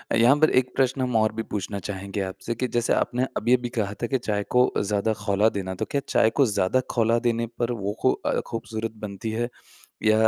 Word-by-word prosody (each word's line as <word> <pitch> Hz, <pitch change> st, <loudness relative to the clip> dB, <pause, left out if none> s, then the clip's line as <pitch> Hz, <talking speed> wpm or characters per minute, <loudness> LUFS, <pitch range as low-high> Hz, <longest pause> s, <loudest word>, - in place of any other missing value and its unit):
यहाँ 120 Hz, +5 st, +6 dB
पर 155 Hz, -, +5 dB
एक 125 Hz, 0 st, -4 dB
प्रश्न 130 Hz, 0 st, +1 dB
हम 125 Hz, -2 st, -1 dB
और 110 Hz, -1 st, +3 dB
भी 115 Hz, -, -2 dB
पूछना 100 Hz, -1 st, -4 dB
चाहेंगे 100 Hz, +1 st, -4 dB
आपसे 95 Hz, +4 st, -4 dB
कि 125 Hz, +3 st, -1 dB
जैसे 120 Hz, -1 st, +1 dB
आपने 125 Hz, +2 st, +1 dB
अभी-अभी 120 Hz, +2 st, +2 dB
कहा 105 Hz, -2 st, 0 dB
था -, -, +1 dB
कि 130 Hz, -, +1 dB
चाय 105 Hz, -4 st, -2 dB
को 125 Hz, 0 st, +4 dB
ज़्यादा 105 Hz, +2 st, 0 dB
ख़ौला 105 Hz, +1 st, +3 dB
देना। 95 Hz, -2 st, -4 dB
तो -, -, -2 dB
क्या 140 Hz, -, +1 dB
चाय 110 Hz, -, +4 dB
को 140 Hz, +4 st, +3 dB
ज़्यादा 105 Hz, +2 st, +1 dB
ख़ौला 115 Hz, 0 st, +2 dB
देने 115 Hz, -1 st, 0 dB
पर 120 Hz, 0 st, +1 dB
वो 100 Hz, -3 st, -2 dB
ख़ू 130 Hz, -, +4 dB
अ, -, -, -1 dB
ख़ूबसूरत 115 Hz, -1 st, -4 dB
बनती 105 Hz, +2 st, -4 dB
है 120 Hz, +2 st, -1 dB, 0.5 s
या 110 Hz, 0 st, +5 dB
115 Hz, 215 wpm, -25 LUFS, 100-120 Hz, 0.5 s, यहाँ